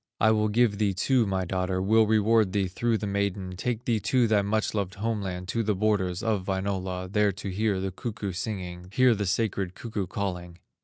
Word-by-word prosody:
"I 110 - +5
will 110 -1 +2
give 105 -2 +2
thee 100 -3 +1
too 120 +3 +2
my 95 -1 -1
daughter, 90 +1 -1
Will 110 +3 +4
reward 110 -2 +3
thee 100 -2 +1
through 115 +5 0
the 105 - -4
maiden, 100 -2 -2
Take 120 +5 -3
thee 115 -3 +1
to 125 +2 +2
thy 105 -2 +3
much 105 +2 0
loved 100 -3 -2
home 110 +1 -2
land, 90 -2 -5
To 115 - 0
the 105 -2 0
borders 95 -2 0
of 105 -4 -1
Wainola, 95 -1 -2
There 105 0 +3
to 95 +1 -6
hear 100 +1 0
the 95 0 -2
cuckoo 105 0 -4
singing, 90 -2 -5
Hear 130 -2 +5
the 100 -2 -2
sacred 95 -1 -1
cuckoo 105 -5 -4
calling." 90 -3 -4
100 Hz, 205 wpm, -27 LUFS, 95-110 Hz, -, I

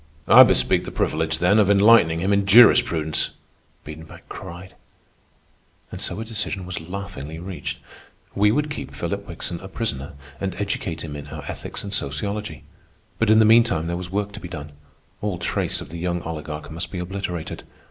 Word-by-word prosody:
"I - - +10
bespeak - - +4
the - - -6
privilege, 80 0 0
then, 90 +6 +3
of 100 -2 +4
enlightening 100 -5 +5
him 95 +3 +1
in 100 -1 +1
jurisprudence," 95 -8 +5 0.5
Biedenbach 75 +1 -11
cried. 90 +2 -9 1.2
And - - -7
so - - -3
a 110 - -4
decision 105 -4 -3
was 90 -2 -5
laughingly 80 -4 -7
reached. 80 -6 -5 0.6
We 105 +1 +3
would 150 +5 0
keep 150 - -6
Philip 100 +4 -4
Wickson 85 +1 -4
a 95 - -9
prisoner 85 - -4 0.3
and 95 -2 -3
educate 95 -4 -3
him 75 -2 -6
in 70 - -8
our - - -8
ethics - - -5
and 100 - -6
sociology. 100 +6 -3 0.6
But 115 - +2
in 110 - +6
the 110 - +6
meantime 115 -7 +4
there 85 +1 -2
was 90 0 -6
work 100 +2 -2
to - - -9
be 90 - -8
done. 75 -3 -7 0.5
All 100 -3 -2
trace 85 - -1
of - - -9
the 85 +1 -7
young 90 0 -2
oligarch 75 -2 -6
must 85 +2 -4
be 95 - -5
obliterated. 90 -2 -5
90 Hz, 180 wpm, -23 LUFS, 80-100 Hz, 1.2 s, I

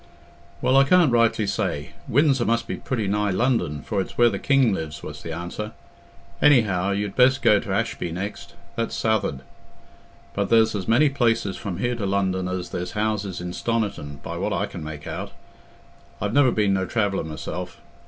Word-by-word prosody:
"Well, 130 +2 +4
I 135 - +7
can't 165 0 +4
rightly 115 -2 +3
say. 75 -6 -2 0.2
Windsor 135 -1 +3
must 115 0 +1
be - - -3
pretty 115 -6 -2
nigh 105 +1 +1
London, 95 - 0
for 100 -2 -1
it's - - -7
where 120 -1 +5
the - - -3
king 135 -6 +3
lives," 80 -4 -5
was - - -7
the 85 - -6
answer. 85 +6 -5 0.7
"Anyhow, 105 -10 +4
you'd 100 0 -2
best 130 +1 +4
go 105 - +5
t' 100 - -8
Ashby 95 -3 -1
next—that's 100 +5 -5
south'ard. 110 -11 0 0.9
But 100 -1 -1
there's 110 -1 +4
as 95 -4 -4
many 125 +7 +4
places 115 -7 +1
from 100 -6 -5
here 120 +5 0
to 105 -4 -3
London 95 -2 0
as 90 -1 -4
there's 90 0 -4
houses 105 -4 -2
in 90 0 -4
Stoniton, 100 -13 -3
by - - -5
what - - -1
I - - 0
can - - -8
make 75 -1 -7
out. - - -5 0.9
I've 105 +1 -2
never 140 -1 +5
been 105 -3 +2
no 95 -1 0
traveller 100 -4 0
myself. 80 +3 -6
105 Hz, 180 wpm, -24 LUFS, 90-115 Hz, 0.9 s, I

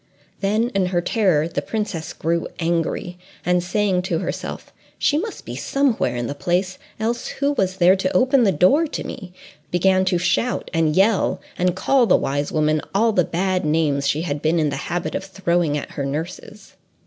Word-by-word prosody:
Then 215 +4 +1
in 195 -5 0
her 180 -1 0
terror 175 -5 +2
the 170 - -3
princess 210 -8 -4
grew 170 +1 -1
angry, 170 +1 -2 0.3
and 180 0 +2
saying 190 -1 +1
to 170 - +1
herself, - - -5 0.2
"She 295 - +2
must 435 +4 -6
be - - -6
somewhere 265 - 0
in 120 0 -2
the 140 - -3
place, 180 +5 -1 0.2
else 230 +2 -2
who 280 +1 -1
was 190 -9 -1
there 185 0 +5
to 185 -1 0
open 260 0 +4
the 200 - +4
door 225 - +4
to - - -5
me?" 190 -7 -8 0.4
began 185 +1 +3
to 180 -1 +2
shout 180 +8 0
and 160 -2 +2
yell, 200 +1 +3 0.2
and 180 0 +1
call 250 +5 +3
the - - +5
wise 145 +1 -2
woman 155 0 +1
all 225 +3 +4
the 185 -4 +3
bad 185 +2 -1
names 150 -3 +1
she 150 +3 0
had 145 -4 -3
been 160 +2 +2
in 155 -2 +2
the - - -2
habit 175 0 -2
of - - -3
throwing 175 -5 0
at 145 - -6
her 140 - -4
nurses. 170 +8 -6
180 Hz, 190 wpm, -21 LUFS, 165-210 Hz, 0.4 s, there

